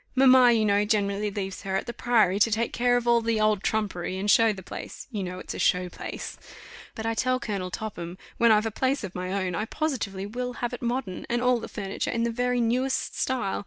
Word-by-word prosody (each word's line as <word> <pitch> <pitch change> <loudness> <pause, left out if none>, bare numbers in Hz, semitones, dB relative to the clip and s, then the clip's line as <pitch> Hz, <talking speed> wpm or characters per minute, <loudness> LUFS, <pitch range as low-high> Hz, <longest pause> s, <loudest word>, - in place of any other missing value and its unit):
Mamma, 260 -2 +7
you 225 -2 +3
know, 205 0 +3
generally 205 -1 0
leaves 195 -2 -5
her 190 -1 -3
at 195 - -1
the 235 - -5
Priory, 220 -7 +2
to 220 - +5
take 225 +2 -1
care 245 0 +3
of 240 0 -3
all 235 0 +5
the 225 -1 0
old 215 -2 +2
trumpery, 195 -5 -2
and 205 +2 +1
show 225 -1 +5
the 190 -3 -7
place - - -8
you 210 -4 -3
know 180 -1 -4
it's - - -6
a - - -6
show 180 0 +2
place. - - -7 0.6
But 220 - -5
I 225 - +1
tell 255 +2 +1
Colonel 200 -6 -3
Topham, 180 -3 -6 0.2
when 235 -1 +5
I've 215 0 +4
a 225 - -1
place 265 +4 0
of 190 -3 -5
my 185 0 -4
own, 190 -2 -1
I 210 +6 -1
positively 220 -9 -3
will 250 +4 -4
have 240 0 -3
it 245 - -6
modern, 240 -6 -3
and 240 0 +1
all 250 0 +3
the - - -6
furniture 195 -2 -4
in 235 -1 0
the 235 - 0
very 245 +1 0
newest 250 +3 0
style. 250 -7 -1
220 Hz, 235 wpm, -26 LUFS, 195-245 Hz, 0.6 s, Mamma